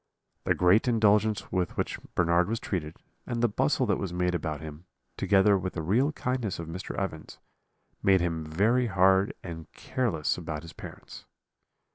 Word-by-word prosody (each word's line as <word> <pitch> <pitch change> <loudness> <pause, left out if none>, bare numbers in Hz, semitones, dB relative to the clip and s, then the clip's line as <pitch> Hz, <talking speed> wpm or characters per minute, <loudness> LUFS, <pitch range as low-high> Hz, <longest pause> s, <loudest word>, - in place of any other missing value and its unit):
"The - - +2
great 90 +7 +4
indulgence 110 -2 +2
with 90 -2 -1
which - - -2 0.2
Bernard 85 +1 +3
was 115 0 -1
treated, 80 -5 -4 0.3
and 120 -1 -2
the - - +6
bustle 105 - +1
that - - 0
was 95 - -3
made 90 0 0
about 80 -4 -2
him, 80 +2 -9 0.3
together 100 0 +3
with 95 0 -4
the 80 - -4
real 120 - +2
kindness 125 - -2
of 85 - -6
Mr. 90 +5 -6
Evans, 85 -5 -5 0.6
made 95 -1 +4
him 85 -2 -1
very 105 +11 +2
hard 95 0 +3
and 80 -3 -8
careless 100 - -1
about 80 -3 -5
his 85 - -10
parents. - - -11
95 Hz, 165 wpm, -28 LUFS, 85-105 Hz, 0.6 s, the